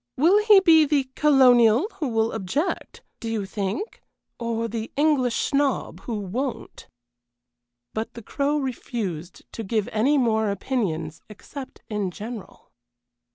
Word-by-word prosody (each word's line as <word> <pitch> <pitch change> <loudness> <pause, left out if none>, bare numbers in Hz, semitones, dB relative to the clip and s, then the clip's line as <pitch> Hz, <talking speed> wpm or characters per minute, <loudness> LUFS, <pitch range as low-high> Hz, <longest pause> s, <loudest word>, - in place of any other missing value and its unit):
Will 370 +9 +4
he 420 -2 +8
be 330 -4 +6
the 280 -3 0
colonial 255 - +5
who 300 - -1
will 225 -1 +1
object, 275 - -3 0.2
do 230 - -5
you 220 -3 -2
think, 200 - -4 0.4
or 230 -1 -2
the 225 0 -5
English 280 -5 +2
snob 280 -1 0
who 230 -3 -3
won't?" 235 +7 -5 1.1
But 220 +1 -4
the 235 - -9
Crow 285 +6 -1
refused 220 - -4
to 225 - -6
give 215 0 -1
any 260 +8 +2
more 220 -4 +2
opinions 195 - -2
except 260 +5 -10
in 210 -3 -2
general. 215 +3 -9
235 Hz, 130 wpm, -24 LUFS, 215-280 Hz, 1.1 s, he